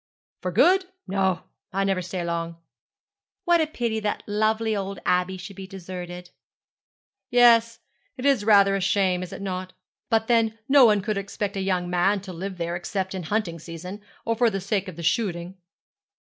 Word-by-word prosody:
'For 180 - -2
good! 365 - +4 0.2
No, 190 -1 0 0.3
I 195 +1 0
never 195 -2 +1
stay 180 0 -4
long.' 170 0 -3 0.9
'What 345 -2 +4
a 315 - +1
pity 235 -7 -2
that 210 -1 -2
lovely 220 +1 +1
old 195 0 -3
Abbey 180 +1 +1
should 190 +2 -9
be 190 0 -8
deserted!' 180 -2 -8 1.0
'Yes, 230 -1 +5 0.4
it 255 - -5
is 275 -6 +3
rather 200 -2 +5
a 195 - -1
shame, 190 -1 +2
is 185 - -6
it 200 - -7
not? 185 -1 -4 0.4
But 225 -1 +2
then 225 -1 +2
no 275 -2 +7
one 210 -2 +3
could 210 0 -1
expect 200 +1 -4
a 195 - -2
young 185 -2 0
man 180 +3 +2
to 190 -1 -8
live 190 +2 -5
there 170 0 -2
except 190 +2 -3
in 190 - -4
the 160 - -8
hunting 200 -5 -1
season 175 +5 -8 0.2
or 230 - +1
for 235 +1 +3
the 195 -2 -3
sake 200 0 -1
of 185 - -7
the 170 - -7
shooting.' 175 0 -1
195 Hz, 185 wpm, -25 LUFS, 180-220 Hz, 1.0 s, no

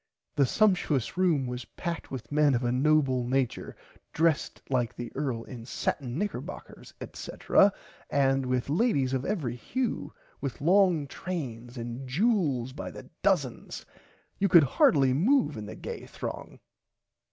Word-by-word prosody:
The 140 -2 +4
sumshious 180 - +2
room 175 -7 +2
was 125 0 -4
packed 170 -2 -5
with 120 -4 -7
men 145 -2 +4
of 120 - -1
a 120 - +1
noble 135 -1 +3
nature 130 -1 -1 0.4
dressed 160 -1 +1
like 125 -4 0
the 120 -1 -6
earl 130 -5 -2
in 120 -2 -9
satin 125 +1 -3
knickerboccers 205 +3 -5
etc 200 - +2 0.4
and 135 -1 +2
with 125 -1 +1
[Pg 140 - -3
68] - - +1
ladies 140 - +2
of 130 0 -1
every 150 - -2
hue 250 - -3 0.3
with 135 -4 -4
long 175 -1 +4
trains 130 -8 -6
and 120 +3 -5
jewels 150 - +1
by - - -6
the - - -11
dozen. 175 - +1 0.7
You 200 - +2
could 170 -3 +8
hardly 135 0 +4
moove 240 - +3
in 105 -2 -6
the - - -7
gay - - -7
throng. - - -7
135 Hz, 150 wpm, -28 LUFS, 125-170 Hz, 0.7 s, could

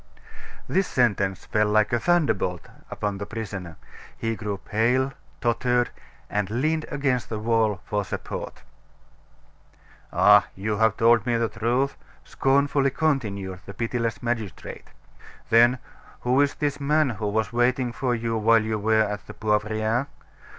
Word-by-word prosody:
This 190 0 +1
sentence 100 -6 0
fell 105 -1 +1
like 105 +2 +2
a 120 - +3
thunderbolt 115 - +1 0.2
upon 100 -1 -3
the 100 - -5
prisoner; 100 -7 -6 0.4
he 115 0 -2
grew 105 -2 -4
pale, 125 +7 0 0.3
tottered, 120 +1 +1 0.4
and 105 -2 -2
leaned 155 +8 0
against 135 -4 -1
the 110 - -3
wall 110 -2 +1
for 105 -1 -1
support. 95 - -6 1.5
"Ah! 105 -1 +6
you 105 +2 -2
have 110 -1 +2
told 115 0 +4
me 120 - +2
the 115 -1 0
truth!" 120 +6 0 0.3
scornfully 140 0 +2
continued 105 -11 -1
the 100 - -8
pitiless 115 +1 -2
magistrate. 115 -7 -4 0.6
"Then, 120 +3 +6 0.4
who 125 +3 +3
is 140 -1 +1
this 145 -1 -2
man 150 0 +2
who 105 -2 -4
was 110 +3 -1
waiting 120 +1 +1
for 125 0 -1
you 115 0 -2
while 115 +1 +4
you 110 -1 -2
were 110 +1 +3
at 105 -1 -5
the 105 - -9
Poivriere? 110 +4 0
115 Hz, 140 wpm, -25 LUFS, 105-125 Hz, 1.5 s, Ah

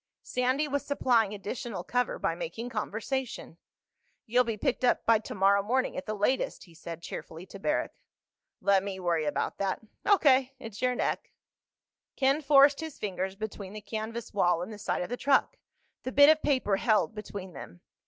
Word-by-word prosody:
Sandy 255 +4 0
was 285 0 -1
supplying 245 -7 +2
additional 210 -1 -5
cover 245 +6 -1
by - - 0
making 245 - -5
conversation. 225 - -4 0.7
"You'll 245 +3 +3
be 230 -3 -3
picked 210 - -1
up 250 - +2
by 230 -1 +5
tomorrow 200 -1 +2
morning—at 260 +5 -1
the 215 - -2
latest," 210 +6 0
he 170 - -17
said 165 0 -8
cheerfully 165 +2 -7
to 195 +1 -11
Barrack. 300 +9 0 0.7
"Let 200 -1 +4
me 195 -1 -5
worry 170 -3 0
about 150 - -2
that." 195 -1 -1 0.3
"O.K. 270 -9 +4
It's 225 -5 -9
your 250 0 +2
neck." - - -2 0.9
Ken 275 +3 +2
forced 280 -1 +6
his 320 -3 -6
fingers 190 -1 -3
between 205 -2 -6
the 215 - -6
canvas 225 +2 -5
wall 175 -3 +2
and 210 +5 -7
the 210 - -10
side 205 - -1
of - - -6
the 245 - -3
truck, 275 +1 +2 0.4
the 255 - -4
bit 285 +2 +7
of 310 0 +5
paper 255 -9 +1
held 220 0 +2
between 200 -3 -7
them. 90 - -10
220 Hz, 175 wpm, -29 LUFS, 195-260 Hz, 0.9 s, bit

